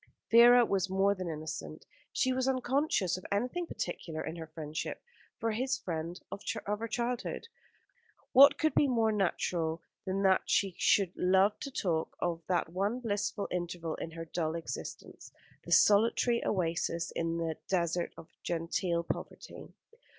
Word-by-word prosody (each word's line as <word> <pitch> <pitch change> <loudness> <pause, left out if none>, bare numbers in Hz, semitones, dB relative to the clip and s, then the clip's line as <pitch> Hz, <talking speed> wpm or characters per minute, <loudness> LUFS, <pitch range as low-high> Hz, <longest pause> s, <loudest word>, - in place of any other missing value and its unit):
Vera 240 +1 +8
was 195 -3 0
more 195 +1 +3
than 185 -3 -5
innocent. 155 0 -6 0.3
She 260 -1 +1
was 260 0 0
unconscious 260 - +1
of 185 - -11
anything 250 +12 -1
particular 165 - -4
in 160 - -5
her 160 -1 -7
friendship 155 0 -5 0.4
for 225 -1 -1
this 260 +3 0
friend 170 - -4
of 200 - -6 0.2
her 210 +3 -2
childhood. 245 - -3 0.8
What 275 +2 +8
could 315 - +1
be 290 - +4
more 230 -4 +2
natural 170 -5 -1 0.2
than 195 +1 -1
that 190 -1 +4
she 195 -2 +2
should 190 -3 +3
love 190 +3 +3
to 280 - -5
talk 170 -11 -2
of 170 -1 -1
that 175 -3 0
one 200 +7 -1
blissful 205 -3 -2
interval 175 -2 -3
in - - -5
her 165 0 -6
dull 160 -1 -2
existence 165 - -7 0.3
the - - -8
solitary 230 +3 +4
oasis 170 -2 -1
in 165 0 -2
the 165 -2 -2
desert 175 -2 0
of - - -11
genteel 170 +1 -1
poverty? 320 - -7
190 Hz, 150 wpm, -31 LUFS, 170-230 Hz, 0.8 s, Vera